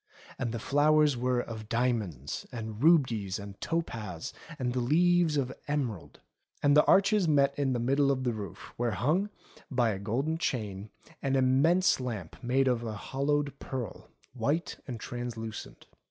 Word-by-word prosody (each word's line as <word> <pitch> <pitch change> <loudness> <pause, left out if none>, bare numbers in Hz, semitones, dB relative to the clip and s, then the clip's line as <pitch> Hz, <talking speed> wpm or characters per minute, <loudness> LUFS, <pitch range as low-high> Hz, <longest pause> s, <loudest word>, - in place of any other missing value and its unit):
And 120 -4 -1
the 115 - -3
flowers 150 +3 +3
were 125 0 +1
of 110 -3 -6
diamonds, 110 - -1
and 110 -2 -6
rubies, 125 - +3
and 100 -1 -9
topaz, 110 - -3 0.2
and 125 -3 -1
the 125 - 0
leaves 165 +4 +3
of 130 -2 -1
emerald. 130 - -3 0.4
And 145 0 +5
the 150 - +7
arches 195 -1 +4
met 140 -2 +4
in 135 -2 0
the 120 - 0
middle 135 +4 +2
of 130 -1 +1
the 120 -2 0
roof 100 -5 -8
where 120 0 +1
hung, 170 - +1 0.4
by 125 -4 +2
a 95 - -4
golden 135 +11 -1
chain, 105 - -3 0.3
an 135 -1 0
immense 135 +9 +4
lamp 110 -10 -5
made 130 +2 +2
of 120 -2 +1
a 110 -2 -3
hollowed 140 +5 -1
pearl, 125 -6 -6 0.2
white 140 +7 -1
and 120 -4 -5
translucent. 115 - -6
125 Hz, 155 wpm, -30 LUFS, 110-145 Hz, 0.4 s, the